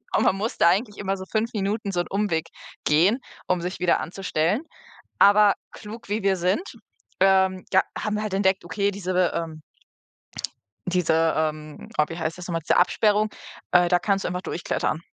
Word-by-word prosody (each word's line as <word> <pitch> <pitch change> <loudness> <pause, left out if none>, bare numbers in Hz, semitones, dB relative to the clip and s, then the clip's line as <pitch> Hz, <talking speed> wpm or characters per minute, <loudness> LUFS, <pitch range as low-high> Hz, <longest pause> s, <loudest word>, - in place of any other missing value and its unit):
und - - +3
man 195 - +3
musste 220 +4 0
eigentlich 205 +5 +2
immer 195 -1 -2
so 190 - -7
5 225 +1 0
Minuten 205 0 -2
so 175 - -1
'n 175 - -1
Umweg 195 -5 -1 0.4
gehen, 175 - +4 0.3
um 180 -1 +1
sich 180 +2 -5
wieder 175 -1 +2
anzustellen. 180 - -1 0.6
Aber, 205 0 +6 0.2
klug, 215 0 -10
wie 210 +1 -1
wir 195 -1 +2
sind, 185 - +1 0.6
ähm, 190 -1 +3
da 190 - +6 0.2
haben 210 0 -2
wir 210 - -1
halt 210 -3 -2
entdeckt, 190 -1 +2
okay, 200 +3 -1
diese, 185 -2 0
ähm 160 -2 -4 1.3
diese, 165 -3 +2
ähm, 155 -1 -3
oh, 150 - +5
wie 165 - -6
heißt 160 -1 -2
das 180 -1 -8
noch 175 - -4
mal? 165 - 0
Diese 160 - +1
Absperrung, 210 +3 +3 0.4
äh, 175 -1 +5
da 180 0 +4
kannst 195 +1 0
du - - 0
einfach 180 +1 -4
durchklettern. 165 -2 -2
190 Hz, 180 wpm, -24 LUFS, 170-205 Hz, 1.3 s, Aber